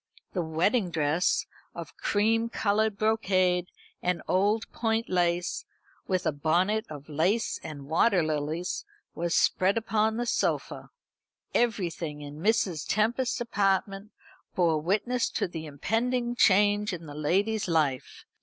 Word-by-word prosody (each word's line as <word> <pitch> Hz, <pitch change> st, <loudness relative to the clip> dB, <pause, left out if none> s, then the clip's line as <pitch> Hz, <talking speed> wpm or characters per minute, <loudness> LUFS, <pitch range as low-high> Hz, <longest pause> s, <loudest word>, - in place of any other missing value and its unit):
The 180 Hz, -, 0 dB
wedding 175 Hz, +6 st, +1 dB
dress, 160 Hz, +1 st, +1 dB, 0.3 s
of -, -, -8 dB
cream 225 Hz, +2 st, +1 dB
coloured 215 Hz, -1 st, 0 dB
brocade 185 Hz, -5 st, +2 dB, 0.3 s
and 180 Hz, -2 st, -1 dB
old 205 Hz, +4 st, +2 dB
point 225 Hz, 0 st, -1 dB
lace, 175 Hz, -1 st, 0 dB, 0.4 s
with 185 Hz, -1 st, 0 dB
a -, -, +2 dB
bonnet 175 Hz, +9 st, +1 dB
of 145 Hz, -2 st, -9 dB
lace 175 Hz, +9 st, 0 dB
and 145 Hz, -3 st, -8 dB
water 175 Hz, +3 st, +3 dB
lilies, 155 Hz, -, -2 dB, 0.3 s
was 170 Hz, 0 st, -1 dB
spread 190 Hz, +3 st, +3 dB
upon 220 Hz, 0 st, +1 dB
the 240 Hz, -, -1 dB
sofa. 235 Hz, -, -1 dB, 0.6 s
Everything 170 Hz, -10 st, -1 dB
in 145 Hz, +1 st, -9 dB
Mrs. 190 Hz, -6 st, +1 dB
Tempest's 235 Hz, +5 st, +1 dB
apartment 200 Hz, -3 st, 0 dB, 0.5 s
bore 165 Hz, -4 st, +2 dB
witness 215 Hz, +8 st, 0 dB
to -, -, -1 dB
the 160 Hz, -2 st, -7 dB
impending 240 Hz, -, -1 dB
change 205 Hz, -1 st, +3 dB
in 170 Hz, -2 st, -6 dB
the 145 Hz, -, -9 dB
lady's 195 Hz, +9 st, 0 dB
life. 150 Hz, -6 st, -1 dB
185 Hz, 125 wpm, -28 LUFS, 160-220 Hz, 0.6 s, water